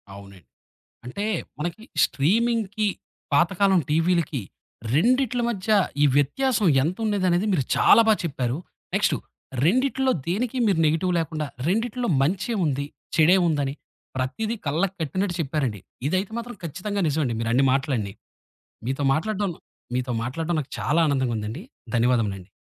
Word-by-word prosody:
అవునం 100 -3 -13 0.6
అంటే 165 +12 -4 0.3
మనకి 175 +7 -4 0.2
స్ట్రీమింగ్‌కి, 215 - +1 0.5
పాతకాలం 185 +4 +3
టీవీలికి 165 -3 +1 0.5
రెండిట్ల 245 - +2
మధ్య 210 -2 -4 0.3
ఈ - - +7
వ్యత్యాసం 210 - +2 0.2
ఎంతుండేదనేది 185 +1 +1
మీరు 150 -7 +2
చాలా - - +6
బాగా 220 -1 +4
చెప్పారు. 130 -4 -2 0.4
నెక్స్టు. - - +2 0.5
రెండిట్లో 260 - +2 0.2
దేనికి 230 +8 -1
మీరు 190 -5 +2
నెగెటివ్ 165 +4 +1
లేకుండా 155 -1 -2 0.2
రెండిట్లో 235 +5 0
మంచే 180 - 0
ఉంది, 140 -1 -1 0.3
చెడే 170 +3 +6
ఉందని 145 -4 0 0.4
ప్రతీదీ 215 - -2
కళ్ళకి 175 +7 0
కట్టినట్టు 180 +4 -1
చెప్పారండి. 135 -8 -1 0.3
ఇదైతే 185 +6 -1
మాత్రం 240 +1 -6
ఖచ్చితంగా 185 +6 -3
నిజమండి 145 -5 0
మీరన్ని 115 +4 +2
మాటలండి. 130 -7 -1 0.7
మీతో 135 +3 -2
మాట్లాడ్డం 200 +4 -1 0.4
మీతో 125 0 -1
మాట్లాడ్డం 160 +8 -2
నాకు 135 - -11
చాలా 155 +3 +1
ఆనందంగుందండి. 125 - -1 0.3
ధన్యవాదములండి. 115 -6 +1
165 Hz, 115 wpm, -24 LUFS, 135-205 Hz, 0.7 s, ఈ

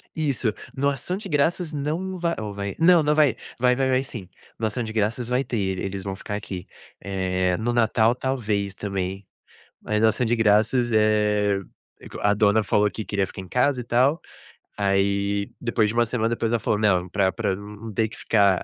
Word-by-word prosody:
Isso, 135 -8 0 0.2
no 140 +1 +2
ação 140 +7 -3
de 200 -1 -7
graças, 160 +3 +1
não 165 +6 -3
vai 170 -1 0
ou 105 -2 -5
vai? 100 -1 -4
Não, 170 0 +6
não 150 0 +2
vai, 150 -5 +3 0.2
vai 125 0 +3
vai 135 - +1
vai 130 0 +2
sim. 115 -8 -8 0.3
No 110 - -1
ação 120 +3 -3
de 110 - -5
graças 115 +2 -1
vai 125 +2 +2
ter, 95 -7 -2
eles 95 0 -4
vão 95 0 -4
ficar 105 - -5
aqui. 95 -3 -6 0.3
Eh, 95 -2 -1
no 115 +2 -1
natal, 115 -1 +3
talvez, 110 -7 -2
também, 95 -1 -4 0.6
mas 105 0 -1
no 110 - +6
ação 120 +2 0
de 120 - +1
graças, 115 +3 +3
eh, 105 -2 +2 0.4
é - - -11
co - - -8
a 105 0 +3
dona 105 +1 +3
falou 105 0 +2
que 110 - -6
queria 100 -2 0
ficar 95 - -9
em 95 - -10
casa, 125 +3 +1
e - - -6
tal, 130 +7 +2 0.6
aí, 100 0 +1
depois 115 -3 +1
de 110 - -3
uma 120 0 +3
semana, 115 -1 0
depois, 115 0 -1
ela 120 - +1
falou: 105 - 0
"Não, 95 -4 +2
pra 95 0 +1
pra 95 +2 -1
num 105 +1 -9
num 110 - -6
ter 110 +2 +1
que 115 - -12
ficar 100 -4 +2
110 Hz, 210 wpm, -24 LUFS, 100-125 Hz, 0.6 s, Não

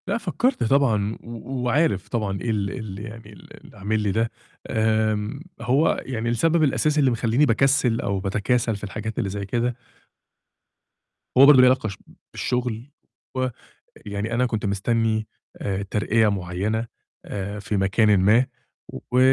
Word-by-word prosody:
لأ - - 0
فكرت 250 +2 0
طبعًا 115 -5 +2
و 120 +3 -6
وعارف 125 - +1
طبعًا 100 -5 -2
إيه 120 - -3
ال 100 -2 -1
ال 105 -6 -6
يعني 110 0 -9
ال 100 - -15
اللي - - -15
عامل 105 +3 -1
لي 105 -2 0
ده، 115 +3 0 0.4
آمم 110 +1 0 0.2
هو 135 +7 +2
يعني 120 -3 -2
السبب 160 +7 +2
الأساسي 150 +1 +2
اللي 135 -3 +4
مخلّيني 120 +4 +2
باكسِّل 125 -1 +2
أو 100 -1 -1
باتكاسل 110 +4 0
في 100 - -10
الحاجات 110 +2 -5
اللي 100 - -1
زي 100 0 -4
كده 120 +4 -1 1.6
هو 135 - +9
برضو 140 -3 +8
ليه 125 - +7
علاقة 130 -4 +2
ش 95 - -8 0.4
بالشغل 125 +1 -2 0.4
ويعني 110 -4 -5
أنا 125 +2 +2
كنت 110 -4 -2
مستني 110 +2 0 0.3
آآ 100 0 -2
ترقية 110 +1 +2
معينة 100 +4 -2 0.4
آآ 100 +1 -5
في 100 +1 -2
مكانٍ 100 +1 +3
ما 110 +7 +4 0.7
و 125 - +3
110 Hz, 150 wpm, -23 LUFS, 105-125 Hz, 1.6 s, هو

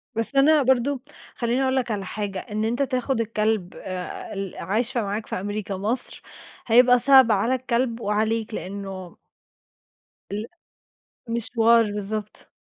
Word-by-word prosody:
بس 225 +5 -1
أنا 290 +2 +5
برضه 260 +1 +2 0.3
خلّيني 240 +2 0
أقول 260 0 +1
لك 250 -3 0
على 200 -2 -2
حاجة 200 -1 -4
إن 215 +3 -3
أنت 240 +4 -1
تاخد 255 -2 -1
الكلب 215 -4 -1
آآ، 185 -1 -6
ال 195 -2 -5
عايشة 230 +7 -1
معاك 210 +1 -3
في - - -4
أمريكا 205 0 -4
مصر، 225 +6 -3 0.5
هيبقى 245 +2 +6
صعب 265 -2 +6
على 225 +5 +2
الكلب 245 -1 -1
وعليك 220 +1 -1
لأنه 190 -2 -6 1.1
ال 210 +2 -3 0.9
مشوار، 230 0 +3
بالضبط. 210 +1 -5
225 Hz, 135 wpm, -24 LUFS, 205-250 Hz, 1.1 s, هيبقى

